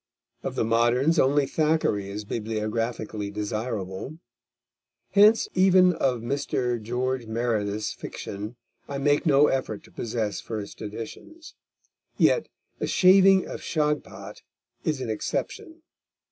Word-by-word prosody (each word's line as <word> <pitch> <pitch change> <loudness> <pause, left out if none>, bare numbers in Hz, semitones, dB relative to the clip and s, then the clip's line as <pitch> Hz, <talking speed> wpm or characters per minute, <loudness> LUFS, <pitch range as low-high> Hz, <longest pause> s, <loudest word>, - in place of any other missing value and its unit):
Of - - -4
the - - +1
moderns, 120 +8 +3
only 140 +2 +3
Thackeray 150 -10 0
is 105 +1 -6
bibliographically 110 -1 -3
desirable. 105 +3 -4 0.9
Hence 210 +3 +5
even 185 -1 +5
of 130 -7 0
Mr. 125 -2 -1
George 125 +2 -2
Meredith's 110 -2 -1
fiction 105 +4 -7 0.3
I 140 - -4
make 145 +4 +2
no 145 0 +6
effort 130 -7 -1
to - - -18
possess 110 -3 -3
first 105 -3 -7
editions; 115 - -8 0.6
yet 470 - +3 0.3
The - - -1
Shaving 190 0 +6
of - - -7
Shagpat 150 -2 -3 0.4
is 150 -4 -1
an 120 -3 -2
exception. 320 - -4
125 Hz, 115 wpm, -26 LUFS, 110-150 Hz, 0.9 s, no